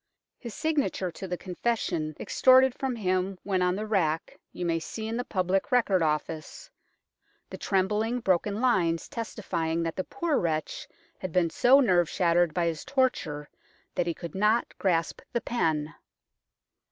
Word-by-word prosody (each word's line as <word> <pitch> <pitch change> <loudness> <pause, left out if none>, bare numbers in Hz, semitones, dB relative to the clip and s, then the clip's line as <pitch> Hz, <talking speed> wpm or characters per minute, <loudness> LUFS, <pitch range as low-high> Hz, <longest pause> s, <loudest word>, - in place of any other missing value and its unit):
His 235 -3 -8
signature 300 - -1
to 190 - -7
the 180 0 -3
confession 175 -6 -2
extorted 260 0 +5
from 265 -1 -3
him 185 -2 -1
when 190 -2 0
on 180 0 +2
the 210 +2 -3
rack 165 -7 -1
you 180 - -5
may 165 -1 +1
see 220 +7 -6
in 225 - -3
the 245 - -1
Public 190 -3 -1
Record 215 -7 +3
Office, 155 - -3 0.8
the - - -6
trembling, 210 +5 0
broken 200 0 +1
lines 175 -10 +2
testifying 170 -8 -3
that 165 -1 -3
the 185 - -2
poor 340 - -1
wretch 155 -3 -2 0.3
had 185 - -5
been 170 -1 +2
so 255 - +5
nerve 180 - +3
shattered 175 -2 +2
by 170 +2 0
his 165 -2 -2
torture 250 - 0 0.5
that 175 - -1
he 170 - -1
could 170 -3 -8
not 210 +4 +1
grasp 165 -4 0
the 235 - 0
pen. 160 -9 -1
185 Hz, 155 wpm, -28 LUFS, 165-230 Hz, 0.8 s, extorted